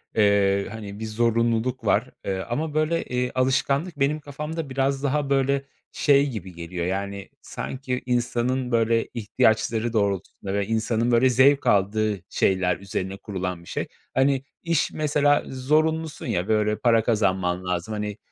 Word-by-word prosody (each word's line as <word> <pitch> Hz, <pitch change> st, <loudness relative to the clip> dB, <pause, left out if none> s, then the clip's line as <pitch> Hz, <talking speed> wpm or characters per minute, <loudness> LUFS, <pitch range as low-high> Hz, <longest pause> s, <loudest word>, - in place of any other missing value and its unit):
eee, 100 Hz, -2 st, +3 dB
hani, 105 Hz, -2 st, -7 dB
bir 110 Hz, -, -4 dB
zorunluluk 115 Hz, +2 st, 0 dB
var. 110 Hz, +5 st, +2 dB
Eee, 95 Hz, -1 st, -1 dB
ama, 150 Hz, +5 st, -2 dB
böyle, 155 Hz, +2 st, +1 dB
eee, 125 Hz, 0 st, -2 dB
alışkanlık 140 Hz, +5 st, +1 dB
benim 145 Hz, +3 st, +1 dB
kafamda 150 Hz, +2 st, -5 dB
biraz 135 Hz, +1 st, 0 dB
daha, 145 Hz, 0 st, 0 dB
böyle, 140 Hz, 0 st, +1 dB, 0.3 s
şey 140 Hz, -1 st, +3 dB
gibi 95 Hz, -7 st, -7 dB
geliyor, 85 Hz, +1 st, -5 dB
yani, 100 Hz, +1 st, -3 dB
sanki 130 Hz, -1 st, -4 dB
insanın, 125 Hz, +1 st, 0 dB
böyle, 115 Hz, 0 st, +2 dB
ihtiyaçları 110 Hz, +1 st, +1 dB
doğrultusunda 100 Hz, -2 st, -1 dB
ve 100 Hz, -1 st, 0 dB
insanın, 115 Hz, +1 st, 0 dB
böyle, 120 Hz, +2 st, +5 dB
zevk 135 Hz, +3 st, +4 dB
aldığı 105 Hz, +1 st, +2 dB
şeyler 95 Hz, -1 st, +1 dB
üzerine 95 Hz, 0 st, -4 dB
kurulan 90 Hz, -4 st, -5 dB
bir -, -, -14 dB
şey. -, -, -3 dB, 0.3 s
Hani, 135 Hz, 0 st, +2 dB, 0.2 s
iş 170 Hz, -2 st, +1 dB
mesela 145 Hz, -1 st, +2 dB
zorunlusun 155 Hz, +4 st, 0 dB
ya. 100 Hz, -6 st, -1 dB
Böyle, 105 Hz, -1 st, +1 dB
para 115 Hz, -2 st, +3 dB
kazanman 95 Hz, -5 st, 0 dB
lazım, 90 Hz, +4 st, -2 dB
hani, 105 Hz, -1 st, -4 dB
115 Hz, 145 wpm, -24 LUFS, 100-135 Hz, 0.3 s, böyle